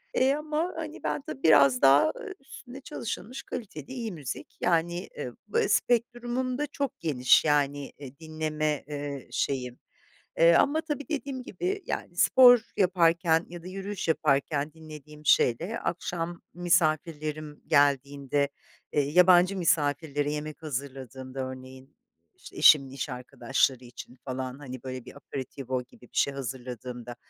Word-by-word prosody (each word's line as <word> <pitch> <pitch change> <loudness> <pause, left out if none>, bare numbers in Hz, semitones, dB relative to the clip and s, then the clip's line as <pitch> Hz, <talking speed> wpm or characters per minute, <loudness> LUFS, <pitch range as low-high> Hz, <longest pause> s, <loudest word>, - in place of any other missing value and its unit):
eee, 265 +1 +4
ama, 305 +3 -2
hani, 315 - -7
ben, 150 -2 -1
tabii, 135 - -8
biraz 140 -5 +6
daha, 135 +1 +7
ııı, 450 -6 -7
üstüne 270 -1 -11
çalışılmış, 255 - -6
kaliteli, 220 -4 -7
iyi 235 -4 -4
müzik. 150 -8 -7
Yani, 175 +1 0
ııı, 125 -4 -5
b 210 - +1
spektrumum 240 +3 0
da 295 0 -1
çok 280 -2 -4
geniş, 130 -3 +4
yani, 145 -1 +1
eee, 140 -1 -11
dinleme, 155 -2 -2
eee, 145 -2 -5
şeyim. 125 -3 -2 0.6
E, 170 0 +6
ama, 300 - +3
tabii, 295 -2 -5
dediğim 275 -4 -3
gibi, 380 +8 -3
yani, - - -4
spor 245 -2 +7 0.2
yaparken 170 -3 +3
ya 175 0 -9
da 180 - -12
yürüyüş 195 0 -5
yaparken 145 -1 +1
dinlediğim 150 -2 -12
şeyle, 170 - +3
akşam 170 0 -3
misafirlerim 155 -3 0
geldiğinde, 140 -1 +2 0.4
eee, 145 - +2
yabancı 180 +2 +6
misafirlere 145 -3 +1
yemek 150 +1 -5
hazırladığımda, 135 -2 -6
örneğin, 130 +1 -8 0.4
işte, - - -14
eşimin 140 -3 +6
iş 135 0 -4
arkadaşları 125 +1 -1
için 120 0 -11
falan, 130 0 -4
hani, 130 -3 -8
böyle 130 -2 -6
bir, - - -12
aperitivo 130 -2 -5
gibi - - -20
bir 125 - -16
şey 140 - +3
hazırladığımda, 125 -2 -6
155 Hz, 135 wpm, -28 LUFS, 135-190 Hz, 0.6 s, daha